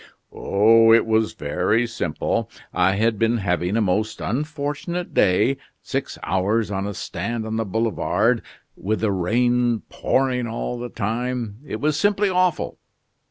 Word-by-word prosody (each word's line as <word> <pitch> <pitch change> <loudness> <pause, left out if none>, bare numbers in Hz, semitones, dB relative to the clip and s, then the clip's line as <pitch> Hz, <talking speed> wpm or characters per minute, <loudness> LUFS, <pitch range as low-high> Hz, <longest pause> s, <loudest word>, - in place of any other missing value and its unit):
"Oh, 115 +3 +4
it 115 - +6
was 110 -1 +1
very 90 +10 0
simple. 90 -9 -2 0.2
I 95 +2 +3
had 110 +1 +1
been 115 +1 +2
having 90 0 0
a - - +2
most 105 +2 0
unfortunate 150 - -3
day 110 +9 +3 0.3
six - - -3
hours 100 +5 0
on 95 0 -2
a 100 - -5
stand 115 +3 -4
on 110 0 -3
the 115 - -1
Boulevards, 110 +1 +1 0.3
with 110 +3 -2
the 110 -2 +1
rain 120 +4 +1
pouring 125 -2 0
all 120 +1 -4
the 120 0 -5
time. 115 0 -3
It - - -4
was 150 0 0
simply 205 +1 +2
awful. 180 -2 0
115 Hz, 145 wpm, -22 LUFS, 100-125 Hz, 0.3 s, it